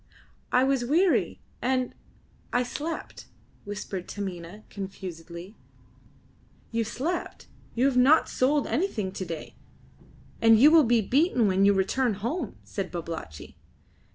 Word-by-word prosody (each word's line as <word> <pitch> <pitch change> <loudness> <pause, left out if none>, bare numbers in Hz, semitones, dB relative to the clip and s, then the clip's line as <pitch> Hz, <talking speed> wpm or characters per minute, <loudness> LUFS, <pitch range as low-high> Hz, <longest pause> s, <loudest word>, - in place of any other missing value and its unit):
"I 250 - +4
was 265 -2 +1
weary, 335 +9 +2 0.2
and 255 0 0 0.6
I 245 - +2
slept," 300 +6 -6 0.4
whispered 200 -2 -5
Taminah, 190 0 -6
confusedly. 185 -1 -8 1.2
"You 230 0 0
slept! 285 +10 -4 0.3
You 245 +3 +2
have 270 -2 +2
not 275 +6 +5
sold 285 +3 +1
anything 230 - -1
to 185 0 -5
day, 165 -2 -7 0.9
and 225 -1 +6
you 290 +5 +8
will 320 -3 +7
be 235 -1 +3
beaten 255 - +2
when 190 0 +3
you 200 - +6
return 215 +4 +1
home," 240 - -3
said 195 -2 -4
Babalatchi. 165 - -7
230 Hz, 125 wpm, -27 LUFS, 190-265 Hz, 1.2 s, you